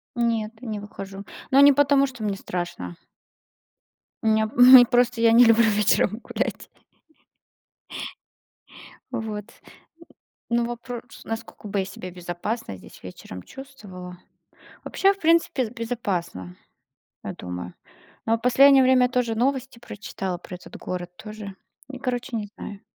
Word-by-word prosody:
Нет, 230 -2 0
не 220 -4 -4
выхожу. 195 -1 -9 0.3
Но 270 - +6
не 285 0 +8
потому 280 0 +4
что 245 -4 -9
мне 200 -2 -1
страшно. 175 - -5 1.3
Мне, 220 0 +2
не 250 0 +10
просто 245 -1 +2
я 230 0 +5
не 240 +2 +8
люблю 230 0 +5
вечером 210 +1 +2
гулять. - - -4 2.4
Вот. 215 -2 -4 1.1
Н 235 - +2
ну 240 - +2
вопрос: 240 0 -8
"Насколько 225 -2 -7
бы 200 0 -2
я 190 - +1
себя 185 -1 -8
безопасно 175 - -5
здесь - - -15
вечером 90 0 -9
чувствовала?" 185 - -11 0.7
Вообще, 390 +1 +2
в 390 - -21
принципе, 330 -5 +3
з - - -9
безопасно, 190 - -4 0.7
я - - -4
думаю. 90 0 -7 0.5
Но 225 - +3
а - - 0
в - - -23
последнее 270 +2 +6
время 255 -1 +4
тоже 245 -3 0
новости 260 +1 -1
прочитала 195 -5 -5
про 180 - -10
этот 180 - -11
город, 180 -1 -5
тоже, 215 -2 -9 0.4
м, 260 - -7
короче, 250 -1 -3
не 210 -2 -4
знаю. 200 -1 -8
225 Hz, 135 wpm, -24 LUFS, 195-245 Hz, 2.4 s, не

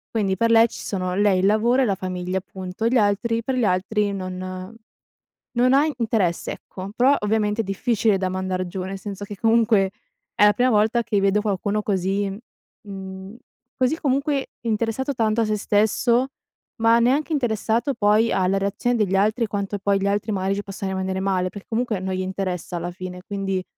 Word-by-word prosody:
quindi 195 -4 +1
per 230 0 +2
lei 225 0 +7
ci - - -9
sono 185 -2 -3
lei, 200 -1 +3
il 185 - +2
lavoro 230 +6 +3
e - - +3
la 200 - +1
famiglia 185 0 -3
punto, 190 +3 -4
gli 250 - +1
altri 225 +2 +1
per 260 +1 -1
gli 245 - +1
altri 200 +2 0
non 185 +1 -6 0.8
non 255 +2 +4
ha 285 +3 +5
i 305 - -2
interesse 215 -7 0
ecco, 190 +1 -8
però 260 +4 +4
ovviamente 210 +1 +1
è - - -5
difficile 210 +1 +1
da 185 -1 -1
mandar 185 -1 -2
giù, 185 +1 -5
nel 190 +1 -5
senso 205 0 -6
che 205 0 -8
comunque 225 -3 +3 0.5
è 210 - +5
la 210 - +6
prima 250 +1 +2
volta 220 +1 +3
che 210 -3 0
vedo 200 +1 +2
qualcuno 205 0 -1
così 195 0 0
m 195 - -6 0.5
mhmm, 190 +2 -8 0.4
così, 260 +5 +1
comunque, 275 0 0
interessato 230 +4 -1
tanto 225 -1 +1
a - - +2
se 215 0 0
stesso, 220 +5 +2 0.5
ma 230 +1 +5
neanche 275 +7 +2
interessato 240 0 0
poi 210 +2 +3
alla 190 +1 +2
reazione 200 +5 0
degli 195 -3 +1
altri, 215 +4 +2
quanto 200 0 -3
poi 200 0 +1
gli 195 - -2
altri 205 +2 0
magari 190 0 0
ci 205 - -2
possano 195 -1 -5
rimanere 190 0 -2
male, 185 -1 0
per 200 0 -10
comunque 225 -3 -1
non 190 0 -3
gli 185 - -2
interessa 185 -2 -3
alla 175 +1 -3
fine, 180 0 -8
quindi 195 -2 -2
205 Hz, 190 wpm, -23 LUFS, 190-230 Hz, 0.8 s, lei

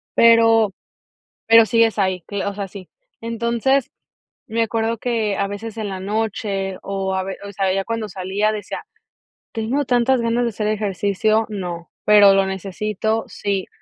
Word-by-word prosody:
pero 225 -3 +5 0.7
pero 230 0 +7
sí 230 +3 +3
es 225 -2 -1
ahí, 185 -3 0 0.2
o 200 - -2
sea, 200 -1 -5
sí. 190 -1 -11 0.3
Entonces 235 +3 0 0.6
me 230 +1 -1
acuerdo 225 +1 0
que 220 -4 -1
a 200 - 0
veces 215 +2 -7
en 215 -2 -3
la 190 -1 -5
noche, 200 -2 -2
o 195 -1 -2
a 190 - -1
ver, 195 0 -5
o - - -7
sea, 195 -1 0
ya 195 0 -1
cuando 230 -2 -3
salía 190 +3 -1
decía: 210 -1 -5 0.7
"¿Tengo 245 +6 -1
tantas 245 +1 +2
ganas 235 +1 +1
de - - +1
hacer 210 -1 -3
ejercicio? 215 +1 +1
No, 175 -5 -6
¿pero 205 -2 +7
lo 195 0 +3
necesito? 210 +3 -2
Sí", 200 -2 -3
210 Hz, 160 wpm, -21 LUFS, 195-225 Hz, 0.7 s, pero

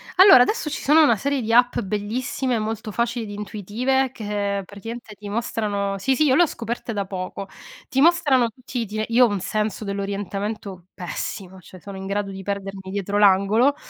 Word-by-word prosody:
Allora, 375 -8 +9
adesso, 320 - -1
ci 300 - -4
sono 310 +3 +5
una 235 -7 +5
serie 275 +5 -1
di 225 0 -1
app 245 +1 +4
bellissime, 230 +5 -2
molto 220 0 -4
facili 235 +1 -1
ed 205 - -8
intuitive 230 +6 -1
che, 205 -3 -2
praticamente, 225 +3 -9
ti 205 +1 -9
mostrano 205 -3 -2
sì, 265 +7 +1
sì, 310 - +2
io 260 -2 +4
l'ho 350 - +6
scoperte 230 -1 -5
da 200 -2 -2
poco. 190 +1 -6 0.4
Ti 270 - 0
mostrano 285 -7 +4
tutti 250 +2 -7
gli - - 0 0.2
iti 215 - 0
io 250 +1 +7
ho - - +1
un 205 -1 -2
senso 215 +3 -2
dell'orientamento 200 -1 -4
pessimo, 185 +2 -6
cioè, 185 +1 -14
sono 195 +2 -9
in 190 - -7
grado 200 0 -2
di 195 0 -7
perdermi 195 -1 -5
dietro 200 +1 -2
l'angolo, 205 +7 +4
210 Hz, 185 wpm, -23 LUFS, 200-245 Hz, 0.4 s, Allora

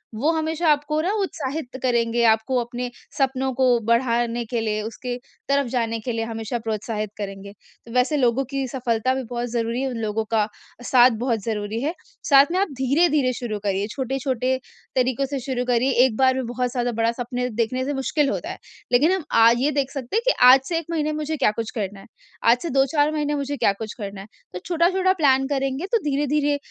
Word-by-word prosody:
वो 285 +9 +1
हमेशा 320 +1 -1
आपको 300 +1 0
ना 360 +5 0
उत्साहित 280 -7 -4
करेंगे, 235 -1 +1
आपको 225 +3 +3
अपने 245 +1 -4 0.3
सपनों 265 -1 0
को 250 -1 +3
बढ़ाने 235 0 +1
के 235 +1 -2
लिए 215 -1 -1
उसके 235 +3 -5 0.3
तरफ 280 -1 +2
जाने 230 -2 -1
के 245 +3 -4
लिए 225 0 -2
हमेशा 225 +1 -4
प्रोत्साहित 215 -1 -3
करेंगे। 200 -1 -6 0.3
तो 230 - -12
वैसे 250 +4 +2
लोगों 250 0 +2
की 275 -1 -1
सफलता 245 -1 0
भी 265 - -3
बहुत 245 0 -3
ज़रूरी 235 +1 -1
है, 270 - -1
उन 245 - -5
लोगों 220 0 -1
का 220 -2 +3 0.4
साथ 250 0 +6
बहुत 230 -5 0
ज़रूरी 215 0 -3
है, 300 +5 -1 0.4
साथ 275 -1 +8
में 365 - +1
आप 400 - +2
धीरे-धीरे 280 -1 +3
शुरू 215 -4 -4
करिए, 200 0 0
छोटे-छोटे 260 -1 -1 0.4
तरीकों 255 +1 +1
से 275 - -1
शुरू 250 -1 -3
करिए। 250 +2 +2
1 250 -4 -1
बार 260 -1 +4
में 260 - -2
बहुत 245 +1 -2
ज्यादा 245 0 -1
बड़ा 230 +1 +3
सपने 250 +1 -2
देखने 240 +3 -1
से 290 - -2
मुश्किल 280 +2 0
होता - - -3
है। - - -6 0.3
लेकिन 290 +8 +4
हम 375 -5 -1 0.2
आज 230 +1 +6
ये 290 - +2
देख 275 -2 -1
सकते 270 - -5
हैं, 465 - 0
कि - - +5
आज 260 +1 +9
से 335 - 0
1 330 - -9
महीने 310 -2 0
मुझे 310 +1 -2
क्या 265 - +3
कुछ 225 - -6
करना 200 -3 -4
है? 195 - -15 0.4
आज 235 +1 +5
से 340 - -3
2-4 285 +3 +2
महीने 295 -1 -1
मुझे 285 0 -3
क्या 200 -4 +3
कुछ 215 - -6
करना 200 -1 -6
है? 195 - -11 0.3
तो 180 - -4
छोटा-छोटा 365 +2 +2
प्लान 270 -6 +3
करेंगे 275 +3 -1
तो 465 - +4
धीरे-धीरे, 290 0 +1
255 Hz, 205 wpm, -23 LUFS, 230-280 Hz, 0.4 s, आज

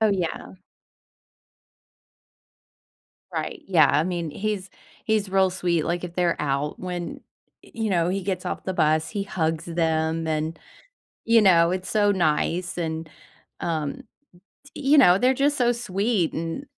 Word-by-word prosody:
Oh, 220 - +4
yeah. 180 -2 -3 2.8
Right, - - -4
yeah, 165 -6 +5
I 150 +3 +2
mean, 170 -3 -3
he's 195 +1 -3 0.3
he's 215 -3 +1
real 190 0 +3
sweet, 175 -3 0
like, 175 +1 -2
if 175 -1 -7
they're 175 -2 +1
out 145 0 -2
when, 180 -2 -5 0.4
y - - -18
you 225 -2 -2
know, 170 -2 +2
he 195 +1 -1
gets 185 -1 -3
off - - -4
the 190 - -2
bus, 155 0 +2
he 205 -2 -2
hugs 160 -4 -2
them, 160 -1 0
and, 155 +1 -2 0.7
you 230 -1 +5
know, 170 -4 +5
it's 185 0 -3
so 205 -1 +3
nice, 175 0 0
and, 160 -1 -3 0.5
um, 155 -4 -3 0.6
t - - -17
you 285 +2 +4
know, 180 -7 +7
they're 255 +4 +3
just 285 +2 +1
so 240 -2 +3
sweet, 205 -4 0
and, 165 - -4
180 Hz, 150 wpm, -24 LUFS, 160-200 Hz, 2.8 s, know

